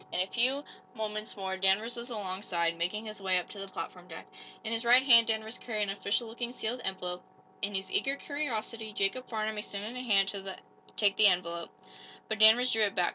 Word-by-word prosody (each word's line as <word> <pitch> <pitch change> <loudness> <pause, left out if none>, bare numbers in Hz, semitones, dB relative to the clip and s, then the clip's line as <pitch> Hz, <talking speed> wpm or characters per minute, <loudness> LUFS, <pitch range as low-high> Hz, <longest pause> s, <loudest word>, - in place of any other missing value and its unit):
In - - 0
a 185 - +3
few 255 +7 +1 0.3
moments 215 0 -4
more 190 -1 -3
Danvers 195 +5 +2
was 240 +1 -5
along 195 -5 -4
side, 170 -4 0
making 185 +6 -2
his 215 -2 -7
way 190 -1 +2
up 180 - -2
to 205 - -9
the 195 - -6
platform 180 -1 -7
deck. 160 - -9 0.4
In 225 0 -3
his 230 +1 -1
right 245 +2 +6
hand 235 -4 +8
Danvers 220 +1 -2
carried 215 -3 -1
an 205 - -2
official 200 +4 -1
looking 235 +2 -4
sealed 245 0 -3
envelope. 180 -1 -4 0.4
In 200 0 -2
his 190 0 -4
eager 275 +1 +1
curiosity 230 -7 -4
Jacob 200 +7 0
Farnum 215 -1 -2
extended 210 +3 -4
a 250 - -4
hand 200 -5 +3
to 195 -1 -5 0.4
take 205 -2 +3
the 215 - +7
envelope, 170 -2 0 0.6
but 220 0 -3
Danvers 225 +4 +7
drew 225 - +1
it 205 -2 +2
back. 180 -1 +2
215 Hz, 210 wpm, -30 LUFS, 190-230 Hz, 0.6 s, hand